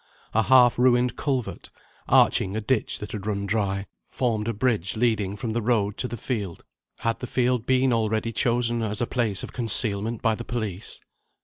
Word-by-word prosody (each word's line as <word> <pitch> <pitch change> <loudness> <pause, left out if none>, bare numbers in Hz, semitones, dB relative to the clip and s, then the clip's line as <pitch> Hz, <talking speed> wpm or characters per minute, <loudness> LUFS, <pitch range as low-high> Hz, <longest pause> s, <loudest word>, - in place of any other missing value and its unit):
A 110 - +3
half 125 0 +5
ruined 125 0 +3
culvert, 130 -5 -3 0.4
arching 95 +2 +3
a - - 0
ditch 115 +1 0
that 105 - -7
had 105 -1 -6
run 100 -1 -2
dry, 100 -1 -1 0.2
formed 115 -4 -1
a 115 - 0
bridge 105 -4 0
leading 110 -4 +1
from 110 +2 -4
the 120 - -1
road 105 -3 +1
to 125 - -2
the 120 0 -6
field. 105 -7 -4 0.4
Had 115 0 -1
the 125 - -5
field 125 -2 0
been 130 -1 +3
already 110 0 0
chosen 120 0 +1
as 105 -2 -1
a 120 - +1
place 115 -6 -1
of - - -7
concealment 110 -1 +1
by 115 - +3
the 120 - -5
police? 110 -5 -5
115 Hz, 185 wpm, -25 LUFS, 105-120 Hz, 0.4 s, half